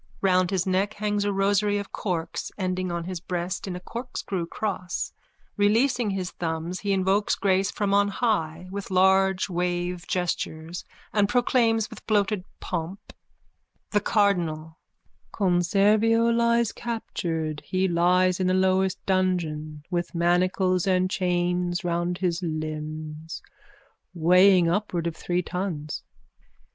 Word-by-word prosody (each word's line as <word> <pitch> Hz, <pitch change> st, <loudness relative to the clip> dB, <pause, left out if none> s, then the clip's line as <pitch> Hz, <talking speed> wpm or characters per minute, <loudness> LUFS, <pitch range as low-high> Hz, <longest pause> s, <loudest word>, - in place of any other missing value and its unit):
Round 185 Hz, -2 st, +3 dB
his 185 Hz, -2 st, 0 dB
neck 195 Hz, +3 st, 0 dB
hangs 205 Hz, -1 st, -1 dB
a 205 Hz, -, +1 dB
rosary 200 Hz, +1 st, +2 dB
of 200 Hz, -1 st, -5 dB
corks 175 Hz, -5 st, -3 dB
ending 185 Hz, -2 st, -2 dB
on 170 Hz, 0 st, -2 dB
his 180 Hz, 0 st, -5 dB
breast 180 Hz, +2 st, -4 dB
in 185 Hz, -, -4 dB
a -, -, -5 dB
corkscrew 200 Hz, -5 st, -5 dB
cross. 180 Hz, -3 st, -3 dB, 0.4 s
Releasing 225 Hz, +3 st, +2 dB
his 190 Hz, -2 st, -3 dB
thumbs, 165 Hz, +1 st, -3 dB
he 205 Hz, -, -2 dB
invokes 195 Hz, +2 st, +2 dB
grace 195 Hz, 0 st, +1 dB
from 200 Hz, -1 st, -1 dB
on 200 Hz, 0 st, +4 dB
high 185 Hz, -6 st, -1 dB
with 200 Hz, 0 st, -5 dB
large 190 Hz, 0 st, +3 dB
wave 175 Hz, -1 st, -2 dB
gestures 170 Hz, -1 st, -3 dB, 0.3 s
and 205 Hz, -1 st, +3 dB
proclaims 230 Hz, -3 st, +2 dB
with -, -, -11 dB
bloated 205 Hz, -2 st, +1 dB, 0.2 s
pomp:)_ 175 Hz, +1 st, -4 dB, 0.9 s
THE 210 Hz, -, +3 dB
CARDINAL: 170 Hz, -7 st, 0 dB, 0.5 s
Conservio 210 Hz, +5 st, +3 dB
lies 235 Hz, -1 st, +2 dB
captured 165 Hz, -9 st, -3 dB
He 185 Hz, 0 st, 0 dB
lies 180 Hz, +1 st, +3 dB
in 185 Hz, -, +1 dB
the 185 Hz, -, +2 dB
lowest 190 Hz, 0 st, +1 dB
dungeon 160 Hz, -6 st, -1 dB
With 175 Hz, -1 st, -2 dB
manacles 180 Hz, +2 st, +2 dB
and 185 Hz, 0 st, +2 dB
chains 175 Hz, -1 st, 0 dB
around 175 Hz, +1 st, -1 dB
his 180 Hz, -1 st, -1 dB
limbs 155 Hz, -1 st, -5 dB, 0.7 s
Weighing 180 Hz, +2 st, +5 dB
upwards 175 Hz, -2 st, 0 dB
of 165 Hz, -, -10 dB
three 180 Hz, +2 st, -1 dB
tons. 170 Hz, -5 st, -4 dB
185 Hz, 130 wpm, -25 LUFS, 175-200 Hz, 0.9 s, Weighing